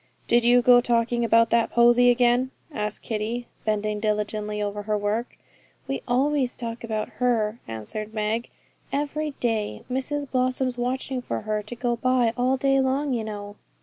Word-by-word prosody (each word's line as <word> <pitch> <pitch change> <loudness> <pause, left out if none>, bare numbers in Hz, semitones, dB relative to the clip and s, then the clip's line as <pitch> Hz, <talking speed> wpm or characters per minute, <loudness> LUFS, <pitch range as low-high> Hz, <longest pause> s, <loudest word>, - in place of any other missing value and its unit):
'Did 240 0 +4
you 245 +1 +5
go 245 0 +7
talking 235 0 +1
about 230 0 +4
that 230 -1 +3
Posy 240 +1 +5
again?' 245 +1 +3 0.2
asked 210 -7 -4
Kitty, 225 +2 -3 0.2
bending 215 -1 0
diligently 210 0 -1
over 205 0 -2
her 210 0 -1
work. 210 +4 -2 0.5
'We 270 - -2
always 260 +1 +1
talk 230 -1 -6
about 220 -2 -3
her,' 230 -2 +1
answered 115 - -6
Meg, 220 +2 -2 0.4
'every 295 +1 -2
day. 215 - -1
Mrs 285 +3 -2
Blossom's 255 -1 0
watching 255 +1 -2
for 115 - -4
her 215 0 -2
to 215 +3 -7
go 240 0 -1
by 250 -1 +2
all 255 +2 +1
day 270 0 +2
long, 270 +1 +1
you 230 -2 -1
know.' 205 -1 -7
235 Hz, 160 wpm, -25 LUFS, 215-255 Hz, 0.5 s, go